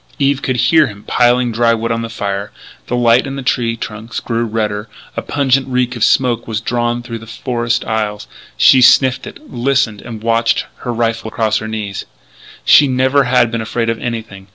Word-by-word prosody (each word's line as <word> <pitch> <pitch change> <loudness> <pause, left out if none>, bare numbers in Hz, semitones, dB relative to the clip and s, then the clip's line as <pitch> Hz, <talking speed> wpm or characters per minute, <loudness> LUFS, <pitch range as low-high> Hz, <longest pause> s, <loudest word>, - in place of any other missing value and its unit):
Eve 140 0 +1
could 130 - -1
hear 155 +4 +4
him 105 -2 -11
piling 120 0 +2
dry 115 +1 +2
wood 115 0 -3
on 115 0 -1
the 115 - -5
fire; 100 -2 -4 0.4
the 125 - -1
light 120 +2 +3
on 135 - -5
the 135 - -5
tree 115 -3 0
trunks 110 0 -6
grew 115 0 -2
redder; 105 -1 -3 0.3
a - - -2
pungent 135 -2 +1
reek 125 -1 -1
of 115 - -2
smoke 120 -3 +2
was 110 -2 -2
drawn 120 +1 -1
through 115 -2 -6
the 115 - -13
forest 120 +1 -2
aisles. 105 -2 -2 0.3
She 130 - +6
sniffed 130 +1 +4
it, - - -10
listened, 125 -4 0
and 115 -2 -9
watched, 115 0 +1
her 120 - -5
rifle 115 -1 -1
across 110 0 0
her 110 - -6
knees. 105 -3 -5 0.7
Eve 145 -2 +2
never 130 +2 +2
had 125 -2 +3
been 115 -1 -2
afraid 115 +1 -1
of 115 - -5
anything. 110 -5 -6
115 Hz, 195 wpm, -16 LUFS, 110-125 Hz, 0.7 s, She